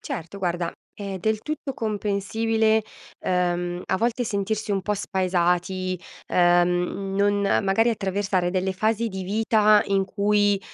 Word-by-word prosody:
Certo 170 +4 -6
guarda, 175 -2 -2 0.2
è 200 -2 -5
del 220 +4 0
tutto 300 0 -4
comprensibile, 220 0 0 0.4
ehm, 175 -1 -1
a - - 0
volte 235 +3 0
sentirsi 215 0 -2
un 195 - 0
po' 210 +2 -1
spaesati. 185 -1 0 0.3
Ehm, 175 +2 +2
non 205 0 +2
magari 200 +2 +2
attraversare 195 -3 -1
delle 190 +1 0
fasi 220 +4 0
di 190 -2 -5
vita, 215 +1 +4
in 195 -1 +1
cui, 205 0 +2
200 Hz, 130 wpm, -24 LUFS, 185-215 Hz, 0.4 s, vita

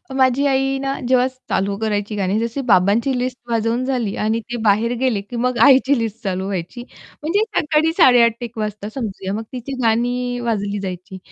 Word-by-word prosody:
माझी 260 +1 +3
आई 270 0 +1
ना 275 0 -1
जेव्हा 255 0 +3 0.2
चालू 195 +1 0
करायची 210 -1 -2
गाणी 195 +1 0
जशी 235 +4 -2
बाबांची 220 +8 +3
लिस्ट 250 0 -2
वाजवून 230 +2 0
झाली 245 -6 -1
आणि 225 +1 +1
ते 240 +1 -6
बाहेर 220 +3 +2
गेले, 245 -6 +1
की 220 +4 -10
मग 250 +1 0
आईची 270 0 +5
लिस्ट 225 0 -4
चालू 190 -1 -2
व्हायची 195 +5 -4 0.4
म्हणजे 345 +7 +1 0.2
सकाळी 310 +1 +2
8:30 245 -7 +6
ते - - -2
1:00 230 -1 -11
वाजता 210 -1 -4
समजूया. 195 -5 -4
मग 220 +2 -3
तिची 255 +2 -6
गाणी 245 +2 0
वाजली 205 -4 -2
जायची. 185 0 -6
230 Hz, 180 wpm, -20 LUFS, 205-255 Hz, 0.4 s, 8:30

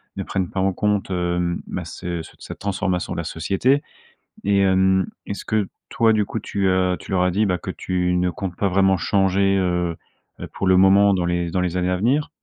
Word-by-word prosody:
ne - - -3
prennent 95 -2 -2
pas 95 - -4
en 95 0 +1
compte, 105 0 -1
hem, 90 -1 -1
bah - - -5
ce 85 -2 -5
c - - -13
cette - - -9
transformation 95 -2 -2
de - - -6
la - - -2
société 130 +9 0 0.6
et 100 0 +2
hem, 95 -1 +3 0.2
est-ce 100 - -5
que 105 -3 0 0.2
toi, 115 -1 +3
du 105 -1 +2
coup, 115 - -4
tu, 100 -2 -1
heu 95 -1 +2
tu - - -11
leur 90 -1 +2
as 90 - +1
dit, 105 +4 +2
bah 90 -2 0
que - - -5
tu 90 -1 -1
ne 90 0 +1
comptes 90 +2 -5
pas 100 - +1
vraiment 95 +1 +3
changer, 95 +2 +2
heu 90 -2 0 0.4
heu, - - -5
pour 95 - -2
le 95 - +5
moment 100 +2 +5
dans 90 -2 0
les 85 -1 -1
dans 90 - 0
les 90 -1 -1
années 90 0 0
à 90 - +1
venir? 130 +10 +1
95 Hz, 225 wpm, -22 LUFS, 90-100 Hz, 0.6 s, le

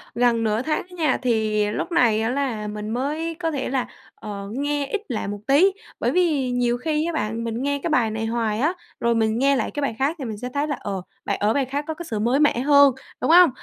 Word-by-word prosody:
gần 235 -1 +2
nửa 215 +1 +1
tháng 305 +3 0
á 360 - -12
nha, 305 -5 +2
thì 220 -4 +1
lúc 285 - -3
này 230 -8 +3
á 225 - 0
là 245 -5 -2
mình 210 0 -5
mới 305 +7 -2
có 325 -2 -1
thể 275 -3 -2
là, 260 -1 -1 0.3
ờ, 200 -1 -7
nghe 290 +2 -1
ít 425 +7 -2
lại 225 - -2
một 205 0 -4
tí. 305 +9 +5 0.3
Bởi - - +1
vì 305 -8 +1
nhiều 245 -1 +1
khi 305 +4 -1
á 340 - -2
bạn, 230 -5 -2
mình 230 +1 -3
nghe 285 0 0
cái 340 - 0
bài 240 -8 +2
này 220 +1 -3
hoài 225 -2 -1
á, 305 +7 +2 0.3
rồi 235 0 +2
mình 220 0 +1
nghe 275 +1 +4
lại - - -1
cái 290 - -4
bài 275 -5 -1
khác 285 +5 +1
thì 270 - -4
mình 220 -3 -5
sẽ 250 +4 -5
thấy 290 +2 0
là, 290 - -1
ờ, 195 -2 -4 0.2
bài - - 0
ở 210 +2 +2
bài 275 -2 +1
khác 285 +3 -3
có 320 - -2
cái 345 +2 -8
sự 215 -2 -2
mới 240 +6 +2
mẻ 295 -5 +3
hơn, 280 0 +6 0.3
đúng - - +2
hông? 350 -2 +8
255 Hz, 260 wpm, -23 LUFS, 225-290 Hz, 0.3 s, hông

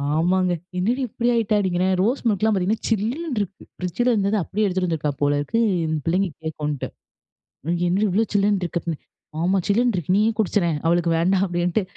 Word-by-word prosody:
ஆமாங்க. 180 +3 +2 0.3
என்னடி 230 +9 0
இப்படி 235 +3 -2
ஆயிட்ட? 230 -2 +1
அப்படிங்றேன் 185 -1 +1
ரோஸ் 245 +7 +1
மில்க்லாம் 220 0 +2
பார்த்தீங்கன்னா, 195 +4 -1
சில்லுன்னு 240 - -1
இருக்கு 195 -1 -6
ஃப்ரிட்ஜ்ல 185 +8 -1
இருந்தத 200 -1 +1
அப்டியே 210 +5 -1
எடுத்துட்டு 185 -2 0
வந்துருக்கா 155 -3 -1
போலருக்கு, 145 +8 +1 0.3
இந்த 160 0 -1
பிள்ளைங்க 185 +3 +1 0.2
கேக்குன்ட்டு. 150 -3 -3 1.0
என்னடி 190 +4 +1
இவ்ளோ 210 +5 +2
சில்லுன்னு 200 -1 +2
இருக்கு 170 0 -2
அப்டின். 165 -3 -4 0.4
ஆமா 185 +3 +2
சில்லுன்னு 235 +3 +2
இருக்கு 180 +1 0
நீயே 215 +2 +3
குடிச்சறேன், 180 -6 +1
அவளுக்கு 170 0 +2
வேண்டாம். 185 +3 +2
அப்டின்ட்டு 175 +3 0
190 Hz, 160 wpm, -22 LUFS, 175-215 Hz, 1.0 s, நீயே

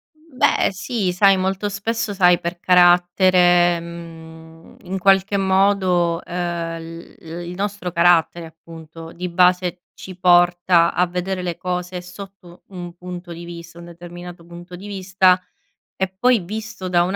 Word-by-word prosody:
Mhmm, 310 -4 -22
beh, - - +2
sì. 205 -1 -3
Sai, 195 +1 +4
molto 190 +2 -2
spesso, 215 +2 -3
sai, 180 -3 +4
per 175 0 -5
carattere, 175 -1 +4
mhmm, 165 -1 -12
in 190 +1 -5
qualche 195 +1 +2
modo, 190 -3 +1
ehm, 170 -1 -4
l 165 +1 -11
l 170 -2 -9
il 175 - -7
nostro 200 -2 -4
carattere, 170 0 +2
appunto, 165 0 -12
di 180 +1 -6
base, 180 0 +1
ci 185 -1 -11
porta 175 -1 +3
a 180 - +2
vedere 180 +1 -4
le 175 -2 -4
cose 180 0 -4
sotto 180 -1 -13
un 175 -3 -9
punto 180 0 -9
di 170 - -10
vista, 170 0 -11
un 170 - -11
determinato 175 0 -11
punto 175 +1 -11
di 200 +3 -10
vista, 185 -2 +2 0.6
e 190 - +2
poi 245 +2 +3
visto 215 +1 -7
da 175 -1 +2
un 185 +3 -2
180 Hz, 150 wpm, -20 LUFS, 170-190 Hz, 0.6 s, Sai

